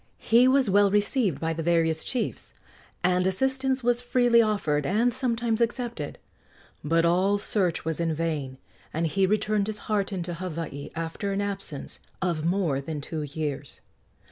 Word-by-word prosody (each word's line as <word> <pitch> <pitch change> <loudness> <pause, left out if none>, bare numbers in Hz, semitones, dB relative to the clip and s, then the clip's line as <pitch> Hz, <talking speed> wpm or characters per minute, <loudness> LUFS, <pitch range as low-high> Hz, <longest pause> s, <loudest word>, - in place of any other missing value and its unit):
He 235 +3 +4
was 265 -1 +4
well 200 +1 +4
received 205 - +1
by 165 0 -1
the 165 - -4
various 165 -1 +1
chiefs, 250 -3 -4 0.5
and 180 +1 +3
assistance 265 +5 0
was 240 0 +2
freely 245 -1 +4
offered 195 -10 +1
and 225 - +2
sometimes 235 -3 0
accepted; 235 - -2 0.7
but 165 +3 +2
all 185 +4 +3
search 195 -5 -1
was 160 0 -2
in 165 -1 +1
vain, 150 -5 -2 0.3
and 165 +2 -1
he 190 +4 +2
returned 210 0 +1
disheartened 205 -3 -2
to 175 - -4
Hawaii 165 -5 -5
after 165 +5 -3
an 195 - -1
absence 195 -8 -5 0.2
of 170 -4 -1
more 170 -6 +1
than 150 +2 -5
two 155 +2 -5
years. 145 -2 -4
190 Hz, 150 wpm, -26 LUFS, 160-220 Hz, 0.7 s, He